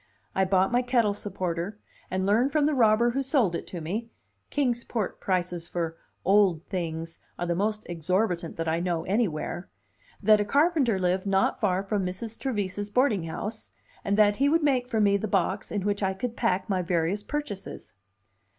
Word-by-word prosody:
I 190 Hz, -, +2 dB
bought 190 Hz, +1 st, +2 dB
my 245 Hz, +1 st, +3 dB
kettle 240 Hz, -4 st, +2 dB
supporter, 185 Hz, -1 st, -3 dB, 0.3 s
and 185 Hz, 0 st, -1 dB
learned 230 Hz, +7 st, +3 dB
from 300 Hz, -1 st, +2 dB
the 305 Hz, -, +2 dB
robber 235 Hz, -2 st, +4 dB
who 270 Hz, +3 st, -1 dB
sold 265 Hz, -, +2 dB
it -, -, -4 dB
to 175 Hz, -, -6 dB
me 210 Hz, +9 st, -3 dB, 0.4 s
(Kings 245 Hz, -5 st, 0 dB
Port 220 Hz, -6 st, -3 dB
prices 180 Hz, -2 st, -1 dB
for 165 Hz, -2 st, -3 dB, 0.3 s
"old 190 Hz, -5 st, +4 dB
things" 165 Hz, -3 st, -4 dB, 0.2 s
are 175 Hz, -, -2 dB
the 175 Hz, -, 0 dB
most 210 Hz, +4 st, -1 dB
exorbitant 175 Hz, +1 st, -1 dB
that 165 Hz, 0 st, -2 dB
I 160 Hz, +1 st, +1 dB
know 170 Hz, -2 st, -1 dB
anywhere) 185 Hz, -3 st, -1 dB, 0.5 s
that 215 Hz, 0 st, +6 dB
a -, -, +2 dB
carpenter 280 Hz, -, +2 dB
lived 185 Hz, +1 st, 0 dB
not 195 Hz, -1 st, +2 dB
far 190 Hz, -2 st, +1 dB
from 200 Hz, 0 st, -1 dB
Mrs. 200 Hz, +5 st, -5 dB
Trevise's 205 Hz, -5 st, -2 dB
boarding 215 Hz, -6 st, +2 dB
house, 210 Hz, +7 st, -5 dB, 0.3 s
and 200 Hz, +1 st, 0 dB
that 205 Hz, -1 st, +5 dB
he 280 Hz, +1 st, +3 dB
would 325 Hz, +1 st, +3 dB
make 260 Hz, -4 st, +2 dB
for 225 Hz, -, 0 dB
me 200 Hz, -1 st, +4 dB
the 215 Hz, -, -3 dB
box 195 Hz, 0 st, 0 dB
in 205 Hz, -2 st, -1 dB
which 205 Hz, 0 st, 0 dB
I 190 Hz, -1 st, 0 dB
could 235 Hz, +4 st, -4 dB
pack 195 Hz, -4 st, 0 dB
my 190 Hz, -3 st, 0 dB
various 175 Hz, +3 st, 0 dB
purchases. 250 Hz, -6 st, -5 dB
200 Hz, 185 wpm, -27 LUFS, 180-230 Hz, 0.5 s, that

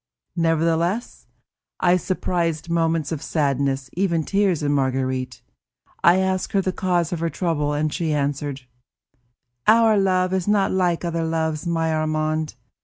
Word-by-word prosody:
Nevertheless, 165 Hz, +5 st, 0 dB, 0.5 s
I 175 Hz, 0 st, +4 dB
surprised 170 Hz, -3 st, -2 dB
moments 165 Hz, -2 st, 0 dB
of 155 Hz, -3 st, -3 dB
sadness, 140 Hz, -3 st, 0 dB
even 170 Hz, -3 st, 0 dB
tears, 195 Hz, -3 st, +1 dB
in 145 Hz, -, +1 dB
Marguerite; 130 Hz, -2 st, -1 dB, 0.6 s
I 175 Hz, +2 st, +6 dB
asked 190 Hz, +2 st, -1 dB
her 195 Hz, -, +3 dB
the 185 Hz, -, -1 dB
cause 175 Hz, -3 st, 0 dB
of 170 Hz, -, -3 dB
her 165 Hz, 0 st, -1 dB
trouble, 155 Hz, -5 st, -1 dB
and 150 Hz, +1 st, -1 dB
she 165 Hz, -3 st, -1 dB
answered: 145 Hz, -1 st, -2 dB, 1.1 s
"Our 220 Hz, -1 st, +5 dB
love 185 Hz, -1 st, +1 dB
is 190 Hz, -1 st, -1 dB
not 205 Hz, -2 st, +2 dB
like 180 Hz, -2 st, 0 dB
other 165 Hz, -1 st, -1 dB
loves, 160 Hz, 0 st, -2 dB
my 165 Hz, -1 st, 0 dB
Armand. 155 Hz, -1 st, -1 dB
165 Hz, 140 wpm, -22 LUFS, 150-185 Hz, 1.1 s, I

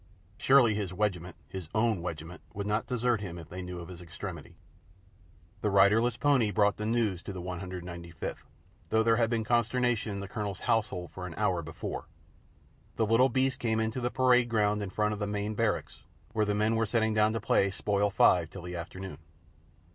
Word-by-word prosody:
Surely 130 Hz, -5 st, +5 dB
his 105 Hz, -3 st, -2 dB
"wegiment," 90 Hz, -2 st, -2 dB
his 95 Hz, -4 st, -7 dB
own 110 Hz, -4 st, +2 dB
"wegiment," 85 Hz, 0 st, -6 dB
would 100 Hz, 0 st, -3 dB
not 105 Hz, +2 st, 0 dB
desert 120 Hz, -3 st, +1 dB
him 90 Hz, -4 st, -6 dB
if 80 Hz, -2 st, -10 dB
they 90 Hz, +1 st, -6 dB
knew 90 Hz, -1 st, -6 dB
of 85 Hz, -, -8 dB
his 90 Hz, -1 st, -10 dB
extremity. 85 Hz, -2 st, -8 dB, 1.1 s
The 105 Hz, -, +1 dB
riderless 105 Hz, +4 st, +4 dB
pony 135 Hz, -6 st, +3 dB
brought 105 Hz, 0 st, +2 dB
the 105 Hz, -, -3 dB
news 110 Hz, -6 st, +1 dB
to 100 Hz, -, -6 dB
the 95 Hz, -, -6 dB
195th, 90 Hz, -2 st, -6 dB, 0.5 s
though 110 Hz, 0 st, +3 dB
there 115 Hz, 0 st, +4 dB
had 115 Hz, -1 st, +2 dB
been 115 Hz, -2 st, 0 dB
consternation 120 Hz, 0 st, +1 dB
in 100 Hz, -, -4 dB
the 100 Hz, -, -5 dB
Colonel's 100 Hz, -1 st, -4 dB
household 105 Hz, -7 st, 0 dB
for 90 Hz, -1 st, -6 dB
an 85 Hz, -, -8 dB
hour 90 Hz, -2 st, +1 dB
before. 80 Hz, -1 st, -6 dB, 0.9 s
The 110 Hz, -, +2 dB
little 115 Hz, +5 st, +4 dB
beast 130 Hz, +1 st, +1 dB
came 110 Hz, -2 st, 0 dB
in 110 Hz, 0 st, 0 dB
through 125 Hz, -, -4 dB
the 120 Hz, -, 0 dB
parade 125 Hz, -1 st, +3 dB
ground 105 Hz, -2 st, +2 dB
in 100 Hz, -, -3 dB
front 105 Hz, +2 st, 0 dB
of 105 Hz, -, -5 dB
the 105 Hz, -, -1 dB
main 105 Hz, +1 st, -2 dB
barracks, 110 Hz, 0 st, -1 dB, 0.3 s
where 110 Hz, -2 st, +2 dB
the 105 Hz, -, +1 dB
men 105 Hz, +2 st, +2 dB
were 115 Hz, 0 st, +1 dB
settling 110 Hz, 0 st, +1 dB
down 110 Hz, 0 st, +3 dB
to 115 Hz, -, -1 dB
play 100 Hz, -, +2 dB
Spoil 100 Hz, +1 st, 0 dB
five 90 Hz, -4 st, +4 dB
till 95 Hz, -1 st, -9 dB
the 90 Hz, 0 st, -6 dB
afternoon. 95 Hz, +2 st, -7 dB
105 Hz, 200 wpm, -30 LUFS, 90-115 Hz, 1.1 s, Surely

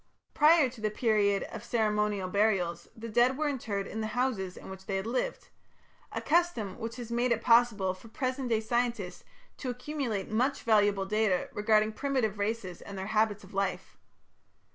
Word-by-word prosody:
Prior 310 Hz, -1 st, +6 dB
to 240 Hz, -3 st, -11 dB
the 215 Hz, -, +1 dB
period 210 Hz, -3 st, +2 dB
of 225 Hz, -1 st, -7 dB
ceremonial 210 Hz, -4 st, 0 dB
burials, 185 Hz, -4 st, +1 dB
the 230 Hz, +1 st, -6 dB
dead 240 Hz, +4 st, +3 dB
were 305 Hz, 0 st, 0 dB
interred 225 Hz, -8 st, -2 dB
in 220 Hz, -, -5 dB
the 220 Hz, -, -1 dB
houses 205 Hz, -8 st, -1 dB
in -, -, -10 dB
which 190 Hz, 0 st, -10 dB
they 195 Hz, -, -1 dB
had 190 Hz, +1 st, -2 dB
lived 255 Hz, -, -2 dB, 0.6 s
a -, -, -3 dB
custom 305 Hz, -, +1 dB
which 230 Hz, 0 st, -5 dB
has 240 Hz, -2 st, -7 dB
made 240 Hz, +1 st, +1 dB
it 230 Hz, -, +1 dB
possible 230 Hz, -6 st, +4 dB
for 185 Hz, +5 st, -14 dB
present 255 Hz, +2 st, -2 dB
day 225 Hz, -2 st, +2 dB
scientists 240 Hz, +2 st, -1 dB, 0.3 s
to 260 Hz, -, -4 dB
accumulate 250 Hz, -5 st, -3 dB
much 250 Hz, +6 st, 0 dB
valuable 205 Hz, -3 st, +3 dB
data 210 Hz, -2 st, +1 dB
regarding 215 Hz, +1 st, +2 dB
primitive 235 Hz, -5 st, -1 dB
races 200 Hz, -3 st, -3 dB
and 200 Hz, -, -8 dB
their 190 Hz, -, -4 dB
habits 215 Hz, -1 st, +2 dB
of 190 Hz, -, -14 dB
life. 195 Hz, -1 st, -2 dB
220 Hz, 175 wpm, -30 LUFS, 200-245 Hz, 0.6 s, Prior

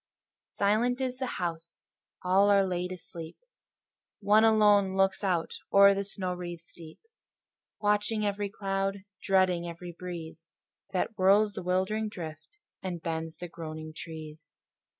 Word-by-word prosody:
Silent 225 Hz, +5 st, +2 dB
is 255 Hz, -1 st, -2 dB
the 260 Hz, -2 st, -3 dB
house: 170 Hz, -1 st, -5 dB, 0.4 s
all 190 Hz, +3 st, +4 dB
are 200 Hz, -1 st, +5 dB
laid 180 Hz, 0 st, -2 dB
asleep: 165 Hz, -2 st, -8 dB, 0.8 s
One 210 Hz, +1 st, +5 dB
alone 210 Hz, -3 st, +5 dB
looks 195 Hz, +1 st, +2 dB
out 175 Hz, -4 st, 0 dB, 0.2 s
o'er 200 Hz, 0 st, +8 dB
the 200 Hz, 0 st, -1 dB
snow 190 Hz, -2 st, -3 dB
wreaths 175 Hz, -1 st, -7 dB
deep, 160 Hz, -2 st, -12 dB, 0.8 s
Watching 210 Hz, +1 st, +1 dB
every 205 Hz, 0 st, -1 dB
cloud, 195 Hz, 0 st, -2 dB, 0.2 s
dreading 185 Hz, -3 st, +2 dB
every 170 Hz, +1 st, -7 dB
breeze 165 Hz, -2 st, -8 dB, 0.4 s
That 185 Hz, +4 st, 0 dB
whirls 200 Hz, +2 st, +4 dB
the -, -, -5 dB
wildering 190 Hz, +4 st, 0 dB
drift, 160 Hz, -, -9 dB, 0.2 s
and 180 Hz, -2 st, -4 dB
bends 160 Hz, -1 st, -4 dB
the 175 Hz, -, -6 dB
groaning 155 Hz, -2 st, -7 dB
trees. 155 Hz, -1 st, -9 dB
185 Hz, 130 wpm, -29 LUFS, 170-205 Hz, 0.8 s, o'er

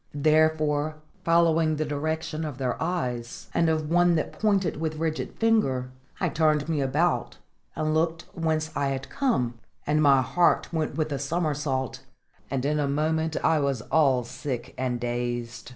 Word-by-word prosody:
Therefore, 155 Hz, 0 st, +2 dB, 0.3 s
following 165 Hz, -2 st, +3 dB
the 155 Hz, +1 st, -1 dB
direction 155 Hz, +2 st, -2 dB
of 150 Hz, -5 st, -5 dB
their 130 Hz, -2 st, -1 dB
eyes, 125 Hz, -9 st, -3 dB
and 165 Hz, -1 st, +3 dB
of 155 Hz, -1 st, 0 dB
one 175 Hz, 0 st, +4 dB
that 155 Hz, -, -1 dB
pointed 195 Hz, -7 st, +1 dB
with 155 Hz, 0 st, -2 dB
rigid 160 Hz, 0 st, -2 dB
finger, 135 Hz, -, +1 dB, 0.3 s
I -, -, +1 dB
turned 155 Hz, -2 st, +2 dB
me 155 Hz, -3 st, 0 dB
about, 150 Hz, +6 st, 0 dB, 0.4 s
and 155 Hz, 0 st, 0 dB
looked 165 Hz, +1 st, 0 dB
whence 160 Hz, -1 st, -1 dB
I 140 Hz, -1 st, +1 dB
had 135 Hz, 0 st, -4 dB
come; 125 Hz, -, 0 dB, 0.3 s
and 150 Hz, +1 st, +2 dB
my 140 Hz, -3 st, +5 dB
heart 175 Hz, +4 st, +2 dB
went 155 Hz, -3 st, -1 dB
with 155 Hz, 0 st, -1 dB
a 140 Hz, -, -2 dB
somersault, 145 Hz, -4 st, -1 dB, 0.5 s
and 135 Hz, -1 st, -2 dB
in 150 Hz, +1 st, +1 dB
a 145 Hz, -, +1 dB
moment 160 Hz, +2 st, 0 dB
I 160 Hz, -1 st, +3 dB
was 140 Hz, -6 st, -1 dB
all 135 Hz, -6 st, +4 dB
sick 125 Hz, +1 st, -5 dB
and 125 Hz, -2 st, -2 dB
dazed. 120 Hz, -1 st, -3 dB
155 Hz, 160 wpm, -26 LUFS, 135-160 Hz, 0.5 s, my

